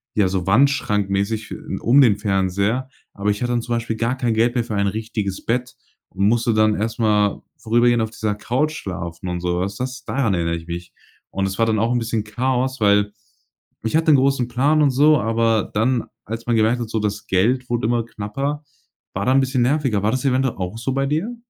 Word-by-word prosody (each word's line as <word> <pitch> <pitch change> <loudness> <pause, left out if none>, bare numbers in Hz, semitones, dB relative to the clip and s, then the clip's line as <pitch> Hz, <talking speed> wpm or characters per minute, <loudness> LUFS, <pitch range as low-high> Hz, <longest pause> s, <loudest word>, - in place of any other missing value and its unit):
ja, 100 -3 +3
so 95 -1 -2
wandschrankmäßig, 105 -3 +1
äh, - - -4 0.3
um 135 +5 +5
den 105 -6 +4
Fernseher, 100 +5 0 0.2
aber 105 0 0
ich 105 - -4
hatte 120 0 0
dann 120 - +1
zum 120 0 -2
Beispiel 115 -1 -2
gar 120 +3 -1
kein 120 -3 0
Geld 120 +3 +2
mehr 120 - +1
für 110 - -5
ein 100 0 +1
richtiges 105 -2 -4
Bett 125 +1 -1 0.3
und 100 +2 0
musste 115 +1 +2
dann 110 0 +3
erstmal 105 -2 +1 0.2
vorübergehend 120 +1 +2
auf 110 - -4
dieser 110 -1 -2
Couch 130 +8 -1
schlafen 90 - -6
und 90 0 -3
sowas. 90 +3 -1
Das 130 +1 -5
daran 125 -8 0
erinnere 85 -1 -1
ich 85 0 -8
mich 85 +1 -6 0.4
und 95 0 -1
das 95 +3 -4
war 115 - +4
dann 110 -1 +1
auch 115 +2 +1
'n 120 - +1
bisschen 115 -2 -2
Chaos, 130 +3 -1
weil 105 0 +3 0.7
ich 115 - -1
hatte 160 -1 +4
'n - - +7
großen 135 -2 +2
Plan 145 +5 +2
und 145 - +4
so, 150 +3 +4
aber 115 -1 +1
dann, 115 +2 +1 0.2
als 115 +2 -6
man 120 - +2
gemerkt 115 +3 +2
hat, 110 - -4
so, 115 - -1
das 105 0 -3
Geld 125 +7 +1
wurde 120 -1 -1
immer 120 -1 0
knapper, 135 +8 -4 0.5
war - - -2
da 130 - +4
'n 135 - +5
bisschen 130 -1 0
nerviger. 130 -6 +1
War 105 - +2
das 130 +1 -2
eventuell 130 -1 +1
auch 90 +4 -4
so 135 - -2
bei 135 0 0
dir? 170 - -2
115 Hz, 215 wpm, -21 LUFS, 105-125 Hz, 0.7 s, n